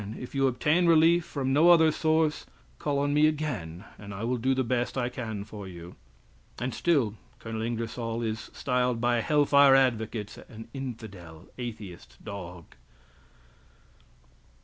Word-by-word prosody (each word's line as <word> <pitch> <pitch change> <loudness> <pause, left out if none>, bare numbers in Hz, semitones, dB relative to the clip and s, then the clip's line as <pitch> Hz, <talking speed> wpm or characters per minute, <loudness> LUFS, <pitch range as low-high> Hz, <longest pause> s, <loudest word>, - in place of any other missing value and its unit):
If 125 - -8
you 135 -1 +2
obtain 150 +8 +2
relief 165 +1 +5
from 135 -2 -2
no 160 +5 +5
other 160 -2 +6
source, 155 0 +1 0.3
call 145 -1 -1
on 145 +1 +1
me 150 +1 +5
again 115 - -3
and 100 -1 -8
I 100 - -6
will 125 +2 0
do 130 +3 +1
the 130 - +1
best 120 +2 -1
I 120 -1 0
can 115 -5 -5
for 105 -1 -9
you!" 85 -1 -10 0.6
And 125 0 -3
still 140 -11 +1 0.2
Col. 110 -1 -6
Ingersoll 115 0 -3
is 110 -1 -4
styled 125 -2 0
by 120 0 +1
hell 150 +1 +2
fire 140 -1 +6
advocates 110 -5 0
an 110 -2 -12
infidel, 100 - -8
atheist, 110 -7 -8
dog! 90 -4 -9
120 Hz, 150 wpm, -28 LUFS, 110-140 Hz, 0.6 s, other